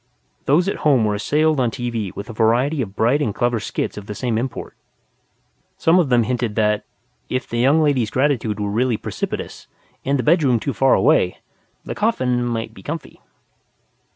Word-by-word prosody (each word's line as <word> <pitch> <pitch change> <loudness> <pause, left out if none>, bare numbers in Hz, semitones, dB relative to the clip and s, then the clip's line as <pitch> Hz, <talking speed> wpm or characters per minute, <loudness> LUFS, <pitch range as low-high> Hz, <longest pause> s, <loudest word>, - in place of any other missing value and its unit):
Those 165 +7 +3
at 200 - -1
home 135 -7 +3
were 105 - +1
assailed 150 +8 +1
on 125 -2 +2
TV 115 -5 -3
with 100 - -6
a 115 - -7
variety 120 +7 +2
of 100 -5 -5
bright 125 +7 +2
and 110 -8 -1
clever 120 -1 +1
skits 105 - -4
of 105 -1 -8
the 105 - -5
same 120 +2 -1
import. 130 +2 -5 1.0
Some 165 +3 +4
of 160 -6 +1
them 120 -2 +4
hinted 120 -2 -2
that, 105 -1 +1 0.4
if 130 - -2
the 120 - -3
young 140 +6 +4
lady's 130 -7 +1
gratitude 125 -6 0
were 100 -1 -2
really 120 +1 +1
precipitous, - - -5 0.4
and 140 +1 +1
the 125 - -1
bedroom 150 -7 +3
too 140 - -3
far 135 0 +4
away, 135 - +3 0.5
the - - -4
coffin 130 - 0
might 115 -2 -3
be - - -13
comfy. 160 +1 -7
125 Hz, 180 wpm, -20 LUFS, 110-145 Hz, 1.0 s, Some